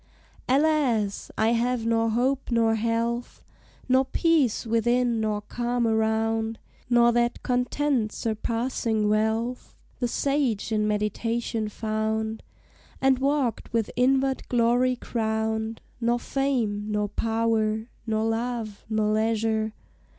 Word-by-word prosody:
Alas! 265 Hz, -8 st, +2 dB
I 220 Hz, +1 st, +3 dB
have 235 Hz, 0 st, 0 dB
nor 230 Hz, 0 st, +2 dB
hope 255 Hz, +4 st, 0 dB
nor 230 Hz, -2 st, +3 dB
health, 230 Hz, +2 st, -2 dB, 0.4 s
Nor 260 Hz, +1 st, +4 dB
peace 285 Hz, -4 st, +2 dB
within 235 Hz, +1 st, +1 dB
nor 210 Hz, -1 st, -1 dB
calm 240 Hz, +3 st, -1 dB
around, 220 Hz, 0 st, +1 dB, 0.3 s
Nor 240 Hz, -1 st, +5 dB
that 240 Hz, 0 st, 0 dB
Content 250 Hz, -1 st, 0 dB
surpassing 225 Hz, -1 st, -1 dB
wealth 220 Hz, +3 st, -1 dB, 0.2 s
The 245 Hz, -, +1 dB
sage 260 Hz, -5 st, 0 dB
in 210 Hz, -1 st, +1 dB
meditation 215 Hz, +1 st, -1 dB
found, 220 Hz, +1 st, -2 dB, 0.6 s
And 265 Hz, -1 st, +3 dB
walked 275 Hz, -3 st, 0 dB
with 230 Hz, -2 st, 0 dB
inward 265 Hz, +1 st, +1 dB
glory 245 Hz, +1 st, +3 dB
crowned, 220 Hz, -1 st, -2 dB, 0.2 s
Nor 240 Hz, 0 st, +1 dB
fame, 240 Hz, -6 st, -1 dB
nor 210 Hz, 0 st, 0 dB
power, 220 Hz, 0 st, 0 dB, 0.2 s
nor 220 Hz, 0 st, 0 dB
love, 225 Hz, -2 st, -3 dB
nor 215 Hz, -1 st, +1 dB
leisure. 220 Hz, 0 st, 0 dB
230 Hz, 110 wpm, -26 LUFS, 220-245 Hz, 0.6 s, Nor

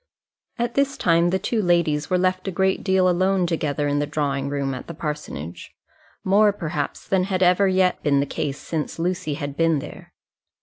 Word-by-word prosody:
At 240 Hz, 0 st, -1 dB
this 275 Hz, 0 st, +1 dB
time 170 Hz, 0 st, +3 dB
the 190 Hz, -, +1 dB
two 215 Hz, +4 st, -1 dB
ladies 165 Hz, -5 st, +1 dB
were 185 Hz, -, +2 dB
left 185 Hz, +1 st, 0 dB
a -, -, -1 dB
great 190 Hz, +1 st, 0 dB
deal 190 Hz, -1 st, +3 dB
alone 185 Hz, +1 st, +2 dB
together 150 Hz, -4 st, -1 dB
in 145 Hz, 0 st, +1 dB
the 145 Hz, -, -1 dB
drawing 140 Hz, -2 st, -1 dB
room 140 Hz, -1 st, -2 dB
at 130 Hz, -, -7 dB
the 170 Hz, -, -7 dB
parsonage; 150 Hz, -, -6 dB, 0.5 s
more, 205 Hz, +2 st, +4 dB
perhaps, 155 Hz, -7 st, -4 dB
than 185 Hz, -1 st, +2 dB
had 190 Hz, -1 st, 0 dB
ever 180 Hz, +2 st, +4 dB
yet 185 Hz, -1 st, +2 dB
been 140 Hz, -2 st, +2 dB
the 140 Hz, -, +1 dB
case 140 Hz, 0 st, -3 dB
since 155 Hz, -3 st, -4 dB
Lucy 170 Hz, -3 st, -2 dB
had 140 Hz, 0 st, -5 dB
been 165 Hz, -1 st, +2 dB
there. 145 Hz, +1 st, -9 dB
170 Hz, 190 wpm, -23 LUFS, 145-185 Hz, 0.5 s, more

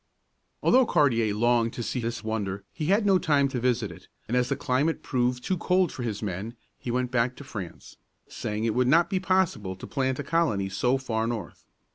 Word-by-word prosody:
Although 255 Hz, -1 st, +5 dB
Cartier 120 Hz, -9 st, +3 dB
longed 115 Hz, +1 st, +2 dB
to 120 Hz, -, -4 dB
see 125 Hz, -, -2 dB
this 115 Hz, 0 st, -3 dB
wonder, 100 Hz, -3 st, -3 dB
he 155 Hz, -, -3 dB
had 205 Hz, +4 st, +3 dB
no 195 Hz, -2 st, +5 dB
time 145 Hz, -6 st, +3 dB
to 130 Hz, -2 st, -2 dB
visit 125 Hz, -1 st, 0 dB
it, -, -, -13 dB, 0.2 s
and 120 Hz, -, -1 dB
as 125 Hz, 0 st, +2 dB
the 140 Hz, -, +1 dB
climate 140 Hz, +3 st, 0 dB
proved 125 Hz, -1 st, 0 dB
too 185 Hz, -, 0 dB
cold 180 Hz, -2 st, +2 dB
for -, -, -7 dB
his 110 Hz, -3 st, -3 dB
men, 105 Hz, +4 st, -4 dB, 0.2 s
he -, -, -6 dB
went 125 Hz, +1 st, -1 dB
back 125 Hz, 0 st, +1 dB
to -, -, -10 dB
France, 100 Hz, -10 st, -8 dB, 0.3 s
saying 105 Hz, 0 st, -4 dB
it 115 Hz, -1 st, +1 dB
would 125 Hz, +1 st, +2 dB
not 165 Hz, +5 st, +4 dB
be 190 Hz, -, +1 dB
possible 185 Hz, -, 0 dB
to 95 Hz, -, -9 dB
plant 130 Hz, -2 st, -1 dB
a 145 Hz, -, -3 dB
colony 140 Hz, -11 st, +1 dB
so 125 Hz, +7 st, +1 dB
far 115 Hz, -4 st, -2 dB
north. 115 Hz, -7 st, -5 dB
125 Hz, 210 wpm, -27 LUFS, 110-145 Hz, 0.3 s, Although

